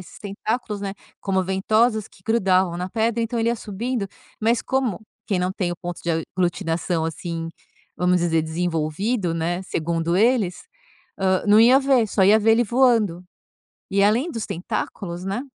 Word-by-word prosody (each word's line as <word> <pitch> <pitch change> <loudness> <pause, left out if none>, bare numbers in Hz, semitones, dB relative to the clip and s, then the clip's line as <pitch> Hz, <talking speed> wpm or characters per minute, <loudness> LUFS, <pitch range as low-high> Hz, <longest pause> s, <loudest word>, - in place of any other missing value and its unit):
esses 180 - -13
tentáculos, 210 +1 -3
né, 195 -1 -4 0.3
como 190 -1 0
ventosas 215 +4 +1
que 185 - -21
grudavam 190 -5 +2
na 180 +1 -3
pedra, 230 +2 0
então 230 +1 -2
ele 230 0 +1
ia 235 - +1
subindo, 220 +1 -3 0.3
mas 230 +2 +2
como 260 -8 -1 0.3
quem 195 - 0
não 180 +1 0
tem 185 -2 -2
o - - -7
ponto 175 -1 -6
de 170 - -1 0.3
aglutinação, 175 -2 0
assim, 165 0 -4 0.5
vamos 180 0 +2
dizer, 165 -2 +2
desenvolvido, 170 +4 -1
né, 170 +2 -1
segundo 170 -1 -1
eles, 215 -4 +2 0.6
hã, 190 -1 +1
não 210 +1 +6
ia 250 +4 +7
ver, 265 -5 +3
só 195 - +1
ia 210 +3 +6
ver 220 +1 +4
ele 235 +2 +3
voando. 225 -7 +2 0.7
E 200 0 +3
além 235 +11 +2
dos 225 -3 -4
tentáculos, 175 +1 -4
né 195 +5 -2
195 Hz, 165 wpm, -23 LUFS, 175-225 Hz, 0.7 s, ia